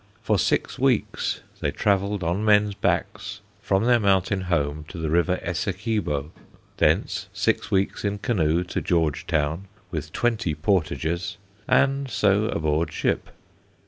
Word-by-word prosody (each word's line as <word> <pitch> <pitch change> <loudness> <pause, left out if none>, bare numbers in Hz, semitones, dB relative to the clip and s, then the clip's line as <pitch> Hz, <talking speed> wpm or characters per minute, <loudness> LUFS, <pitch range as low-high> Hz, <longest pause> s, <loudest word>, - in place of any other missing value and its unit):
For - - +2
six - - 0
weeks - - +1 0.2
they - - 0
travelled 100 -1 0
on 90 +5 0
men's 105 -1 +4
backs, 105 +1 -2 0.2
from 100 0 +1
their 120 0 +4
mountain 95 -2 +2
home 75 -3 0
to 90 - -9
the 80 -2 -2
River 85 +2 +2
Essequibo; 90 -4 -2 0.5
thence, - - +1
six - - 0
weeks 95 -2 0
in 100 0 -1
canoe 90 - +1
to 90 - -3
Georgetown, 80 +1 0 0.2
with 75 -3 -4
twenty 110 -9 0
portages; 85 0 -1 0.3
and, 140 0 +2
so 105 -2 +2
aboard 80 -4 0
ship. - - -1
95 Hz, 130 wpm, -24 LUFS, 80-105 Hz, 0.5 s, men's